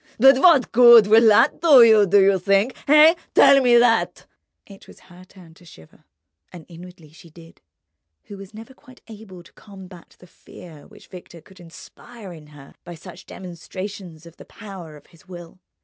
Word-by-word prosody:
But 270 +3 +2
what 315 -6 0
good 235 -2 +4
will 225 +2 +1
that 225 +8 0
do 290 -8 +3
you, 220 -3 +1
do 200 +2 0
you 195 -1 -1
think? 200 +7 -3
Eh? 305 +2 +3 0.2
Tell 275 0 +2
me 245 -2 0
that!" 235 -1 -3 0.4
It 195 -1 -20
was - - -20
her 180 0 -21
turn 180 -3 -22
to 175 - -25
shiver, 80 - -22 0.5
and 175 -3 -16
inwardly 175 -2 -18
she 170 +2 -21
did, 165 +1 -22 0.6
who 205 - -15
was 195 -1 -16
never 225 +4 -16
quite 255 -1 -24
able 205 -5 -17
to - - -25
combat 190 -4 -19
the - - -22
fear 165 -3 -19
which - - -22
Victor 175 -2 -17
could 190 +3 -24
inspire 190 +4 -17
in 155 -2 -18
her 145 -2 -20
by 175 0 -14
such 175 +2 -18
demonstrations 180 -1 -13
of 170 0 -20
the - - -18
power 185 -7 -15
of 145 - -24
his 165 -4 -27
will. 175 0 -16
190 Hz, 180 wpm, -17 LUFS, 170-225 Hz, 0.6 s, good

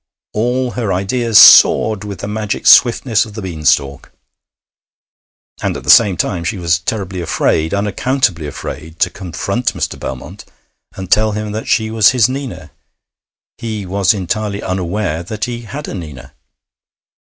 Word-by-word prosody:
All 125 +3 -1
her 115 -5 -3
ideas 105 +5 0
soared 110 -1 +7
with 100 -2 -7
the - - -5
magic 105 0 -4
swiftness 120 -2 +5
of 105 -2 -11
the 110 - -6
bean 80 -5 -7
stalk. 70 0 0 1.5
And - - -2
at - - -10
the - - +4
same 100 -6 +5
time 85 -1 -2
she 95 +5 -3
was 85 -2 0
terribly 95 -1 -4
afraid, 80 -1 0
unaccountably 100 - -1
afraid, 80 +2 -8
to - - +2
confront 100 +6 -3
Mr. - - -4
Belmont 65 -1 -8 0.5
and 95 -2 -8
tell 110 0 +3
him 105 0 -4
that 110 +1 -5
she 110 0 0
was 110 -1 +4
his 115 - +5
Nina; 135 -1 -7 0.9
he 110 -3 -5
was 95 0 +1
entirely 105 +1 -3
unaware 90 -2 -3
that 105 +4 -5
he 120 -1 -6
had 145 +6 -7
a - - -6
Nina. 70 -7 -9
100 Hz, 155 wpm, -15 LUFS, 90-110 Hz, 1.5 s, soared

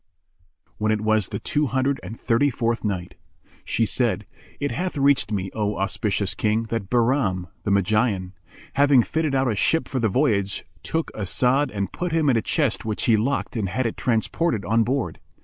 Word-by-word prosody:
When 110 0 +1
it 110 -1 0
was 110 -2 +2
the - - -4
Two 150 0 0
Hundred 130 +3 0
and 115 - -8
Thirty 130 +4 +2
fourth 115 -2 -1
Night, 95 -4 -3 0.5
She - - +1
said, - - 0 0.3
It 145 - -1
hath 180 -2 -3
reached 140 -4 +3
me, 95 -2 -2
O 105 -1 -1
auspicious 100 0 -1
King, 110 +3 0
that 110 -4 -3
Bahram, 120 -7 +1 0.2
the - - 0
Magian, 100 -1 +1 0.4
having 140 -3 +5
fitted 155 0 -1
out 135 0 +2
a - - -1
ship 160 +10 +1
for 130 - -2
the 115 -2 +2
voyage, 100 -5 0 0.2
took 165 0 -2
As'ad 125 +7 +1
and 100 -2 -3
put 175 -2 -3
him 155 -4 +3
in - - +2
a 115 - +2
chest 140 0 0
which 110 -2 -2
he 115 - +5
locked 125 +6 -1
and 105 -5 -1
had 130 +8 -1
it 115 - -1
transported 115 - 0
on 115 +3 +3
board. 130 +3 -2
115 Hz, 185 wpm, -23 LUFS, 105-135 Hz, 0.5 s, having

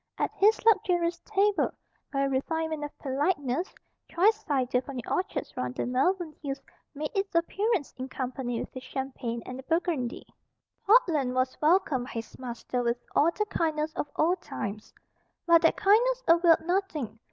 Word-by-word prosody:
At - - 0
his 425 +3 +4
luxurious 355 -5 +3
table, 415 -1 +1 0.4
by 275 - 0
a 275 - +2
refinement 315 +3 -1
of 295 - -7
politeness, 285 +2 -1 0.4
choice 430 +5 +3
cider 255 -5 +1
from 275 0 -9
the 245 - -5
orchards 375 +2 -2
round 125 0 -3
the - - -2
Malvern 310 +7 0
Hills 275 -2 -4 0.4
made 300 +2 -3
its 390 -3 -2
appearance 390 - 0
in 260 +1 -5
company 255 -2 -3
with - - -6
the 255 - -7
Champagne 255 -3 -5
and 255 +1 -7
the - - -8
Burgundy. 325 -7 -1 0.6
Portland 325 - +4
was 255 0 +1
welcomed 305 -6 +3
by - - -9
his 225 -1 -7
master 250 0 -3
with 235 0 0 0.2
all 305 - +5
the 425 - +1
kindness 315 -5 -1
of 290 - -3
old 350 +4 +2
times. 210 +1 -6 0.5
But 335 -1 +6
that 330 - +3
kindness 485 +5 +3
availed 335 0 +5
nothing. 325 - -2
305 Hz, 165 wpm, -28 LUFS, 260-365 Hz, 0.6 s, But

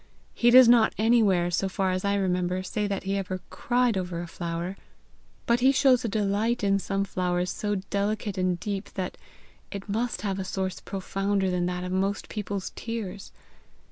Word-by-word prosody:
He 240 - +3
does 255 0 +9
not 235 -2 +5
anywhere, 210 -6 +3
so 190 +2 0
far 190 -1 0
as 185 0 -2
I 200 0 +1
remember, 180 -1 0
say 205 +3 -2
that 195 -1 -3
ever 195 -1 -1
he 185 - -8
cried 245 -2 +1
over 180 -2 -4
a 175 - -4
flower, 170 +1 -4 0.7
but 235 +1 +3
he 260 +2 +5
shows 265 -2 +4
a - - 0
delight 210 +2 0
in 195 0 +3
some 195 0 -1
flowers 180 -1 -1
so 205 -1 -2 0.2
delicate 205 0 -1
and 185 -2 0
deep 200 0 -4
that 185 -2 -3 0.5
it 200 0 -7
must 220 0 -2
have 195 -2 -1
a - - -2
source 190 0 -3
profounder 195 0 -1
than 180 -1 0
that 180 0 -3
of 180 - -4
most 195 +2 -1
people's 205 -2 -4
tears. 210 -4 -5
195 Hz, 180 wpm, -27 LUFS, 185-215 Hz, 0.7 s, does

